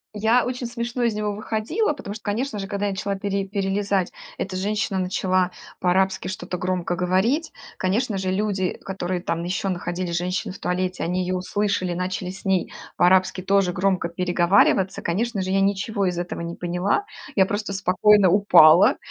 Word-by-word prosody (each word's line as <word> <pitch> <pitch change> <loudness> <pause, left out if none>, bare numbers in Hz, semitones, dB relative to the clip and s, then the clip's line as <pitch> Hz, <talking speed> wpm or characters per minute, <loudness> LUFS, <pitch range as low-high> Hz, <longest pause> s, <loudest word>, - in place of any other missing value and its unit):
Я 225 +4 +3
очень 250 -1 -3
смешно 235 +1 -4
из 230 -3 +1
него 210 -1 -2
выходила, 220 - -1
потому 205 -7 -7
что, 215 - -9
конечно 215 +2 -2
же, 195 - -4
когда 205 0 -2
я 200 - 0
начала 195 +1 -2
пере 195 0 -2
перелезать, 195 -1 -1 0.3
эта 190 -1 -4
женщина 205 0 -1
начала 185 0 +1 0.3
по-арабски 190 +1 +1
что-то 185 -1 -5
громко 180 -1 -1
говорить. 190 - +1 0.3
Конечно 200 +2 0
же, 185 -1 -2
люди, 190 -2 -1
которые 185 -2 -3
там 170 0 -2
ещё 180 +2 -2
находились, 175 -1 -3
женщины 180 +1 -2
в - - -12
туалете, 185 0 -2
они 180 +2 -1
её 185 +1 -1
услышали, 185 -1 -1
начали 180 0 -3
с 190 +2 -10
ней 190 -2 +1 0.2
по-арабски 185 +1 +3
тоже 195 -1 +2
громко 185 -2 +1
переговариваться. 180 +2 +2
Конечно 200 +3 -1
же, 185 - -3
я 195 +1 +2
ничего 200 +1 0
из 180 -1 -1
этого 175 -1 -4
не 170 0 -4
поняла. 180 - -1 0.3
Я 190 -2 +4
просто 205 0 -3
спокойно 195 +1 +4
упала, 180 -3 +6
190 Hz, 170 wpm, -23 LUFS, 180-205 Hz, 0.3 s, упала